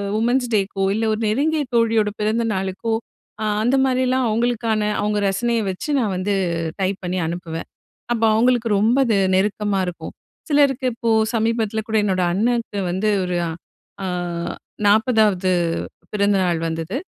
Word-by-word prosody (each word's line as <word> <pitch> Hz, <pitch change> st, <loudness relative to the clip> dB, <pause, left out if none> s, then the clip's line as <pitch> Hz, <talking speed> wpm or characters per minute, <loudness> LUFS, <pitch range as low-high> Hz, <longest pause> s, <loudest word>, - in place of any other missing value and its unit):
Women's 245 Hz, +3 st, +1 dB
taco 195 Hz, -1 st, 0 dB
இல்ல 225 Hz, +1 st, 0 dB
ஒரு 215 Hz, -, -3 dB
நெருங்கிய 295 Hz, +7 st, +1 dB
தோழியோட 225 Hz, -2 st, +3 dB
பிறந்தநாளுக்கோ, 215 Hz, -1 st, -1 dB, 0.5 s
அ -, -, -1 dB, 0.2 s
அந்த 245 Hz, +4 st, +2 dB
மாரிலாம் 255 Hz, 0 st, +1 dB
அவுங்களுக்கான 225 Hz, -1 st, 0 dB, 0.2 s
அவுங்க 210 Hz, 0 st, 0 dB
ரசனைய 235 Hz, +4 st, 0 dB
வச்சு 185 Hz, +11 st, -7 dB
நான் 215 Hz, -6 st, 0 dB
வந்து 195 Hz, +3 st, -1 dB, 0.5 s
டைப் 190 Hz, 0 st, 0 dB
பண்ணி 180 Hz, +1 st, -2 dB
அனுப்புவேன். 165 Hz, -1 st, -5 dB, 0.5 s
அப்ப 230 Hz, -, -3 dB
அவுங்களுக்கு 235 Hz, +1 st, +2 dB
ரொம்ப 225 Hz, +5 st, +3 dB
அது 220 Hz, -3 st, +2 dB, 0.2 s
நெருக்கமா 205 Hz, +1 st, 0 dB
இருக்கும். 180 Hz, -, -6 dB, 0.4 s
சிலருக்கு 280 Hz, -3 st, +3 dB
இப்போ 230 Hz, 0 st, -2 dB, 0.3 s
சமீபத்துல 225 Hz, -1 st, 0 dB
கூட 220 Hz, -1 st, +1 dB
என்னோட 190 Hz, -3 st, +1 dB
அண்ணனுக்கு 230 Hz, +1 st, 0 dB
வந்து 190 Hz, +4 st, 0 dB, 0.2 s
ஒரு 180 Hz, 0 st, -2 dB, 0.7 s
அ -, -, -2 dB, 0.8 s
40வது 210 Hz, -3 st, +3 dB, 0.6 s
பிறந்தநாள் 195 Hz, -4 st, +2 dB
வந்தது. 165 Hz, +7 st, -3 dB
215 Hz, 130 wpm, -21 LUFS, 195-235 Hz, 0.8 s, தோழியோட